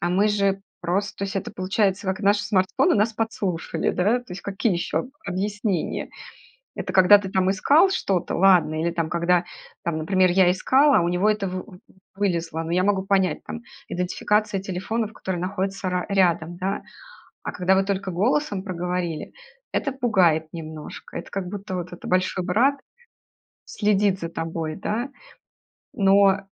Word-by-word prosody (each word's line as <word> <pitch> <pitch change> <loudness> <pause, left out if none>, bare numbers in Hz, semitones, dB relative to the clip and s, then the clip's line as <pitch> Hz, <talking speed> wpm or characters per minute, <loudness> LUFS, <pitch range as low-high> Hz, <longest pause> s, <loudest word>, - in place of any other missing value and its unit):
а 175 - 0
мы 195 +4 +3
же 200 -2 +1 0.2
просто" 195 +3 -1
То 200 - -1
есть 195 - -5
это 195 - -3
получается 195 +1 0
как? 190 +2 -1
Наши 205 0 +2
смартфоны 185 -2 +2
нас 215 +2 +2
подслушали, 210 -6 -2
да, 210 +7 +2
то 245 - -21
есть 180 - -8
какие 200 +2 0
ещё 170 -1 -1
об 250 - -8 0.2
объяснения? 200 0 -2 0.7
Это - - -5
когда 190 +2 +8
ты 200 -1 -5
там 190 0 +1
искал 295 - +4
что-то- 195 - -1
ладно. 175 -4 +4
Или 170 +1 0
там, 165 -2 -2
когда 170 +1 +2 0.4
там, 170 -2 -1
например, 185 +4 +2
я 180 0 +5
искала, 270 +9 +4
а - - +2
у 170 - 0
него 180 +4 +2
это 210 -2 0
вы 185 0 -4
вы 185 -5 -14 0.4
вылезло, 170 -5 -1
ну 165 - -5
я 180 +1 +2
могу 200 -2 +2
понять 190 -4 +1
там: 235 - -7 0.3
идентификация 200 +3 0
телефонов, 205 +4 -3
которые 185 -4 -4
находятся 190 +1 -2
ра 180 0 -1
рядом, 175 -4 +2
да. 190 +2 -2 0.6
А - - -3
когда 180 +1 +2
вы 195 - +3
только 195 0 -2
голосом 205 - 0
проговорили- 180 -3 -3 0.4
это 275 - 0
пугает 190 -12 +2
немножко. 155 -2 -8
Это - - -7
как 195 -2 -3
будто 200 -1 -5
вот 180 0 -5
это: 175 - -9
"Большой 185 0 +1
Брат 255 +10 +2 0.9
следит 205 -2 +1
за 165 - -3
тобой",- 165 -1 -4
да. 230 +6 -3 0.8
Но 195 0 +4
190 Hz, 165 wpm, -24 LUFS, 180-205 Hz, 0.9 s, когда